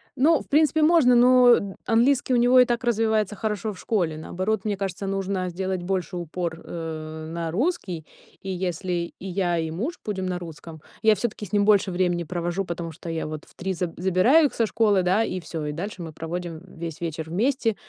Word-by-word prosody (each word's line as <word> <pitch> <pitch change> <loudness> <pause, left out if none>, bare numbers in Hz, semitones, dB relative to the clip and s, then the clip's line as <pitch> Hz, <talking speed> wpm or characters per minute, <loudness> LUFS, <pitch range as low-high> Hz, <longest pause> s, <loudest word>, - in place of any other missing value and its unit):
Ну, 295 +3 +4
в - - -14
принципе 310 +1 +3
можно, 305 -6 +5
но 245 -5 +5
английский 245 +3 +3
у - - +4
него 245 +2 +5
и 250 - +7
так 240 0 -1
развивается 220 -3 +1
хорошо 215 +1 -2
в 185 - -13
школе, 175 -8 -1
наоборот, 190 +6 -2
мне 210 -1 0
кажется, 195 0 -4
нужно 195 -1 -2
сделать 185 +1 -3
больше 185 -1 -2
упор, 170 -1 -4
э, 160 -1 -6
на 165 -1 -3
русский, 190 - -2 0.4
и 195 - -6
если 180 -1 -2
и - - -9
я, 180 -2 0
и 160 -1 -2
муж 245 - -4
будем 195 -3 -3
на 180 -1 -2
русском, 160 -2 -10 0.2
я 220 -1 +5
всё-таки 210 0 -3
с 200 - -15
ним 205 -1 +3
больше 205 -2 +4
времени 175 -1 0
провожу. 175 +3 -2
Потому 170 -1 -5
что 165 +2 -9
я 165 -1 -3
вот 155 0 -6
в - - -22
3 190 +1 -3
за 175 -1 -3
забираю 190 - +4
их - - -11
со 230 - +1
школы 210 -3 +2
да, 185 +5 +3
и 185 -4 -3
всё 165 -2 -5
и 150 - -2
дальше 185 +5 -5
мы 165 -2 -6
проводим 165 +1 -5
весь 165 -3 -7
вечер 160 -1 -4
вместе. 225 - +1
185 Hz, 205 wpm, -25 LUFS, 170-220 Hz, 0.4 s, и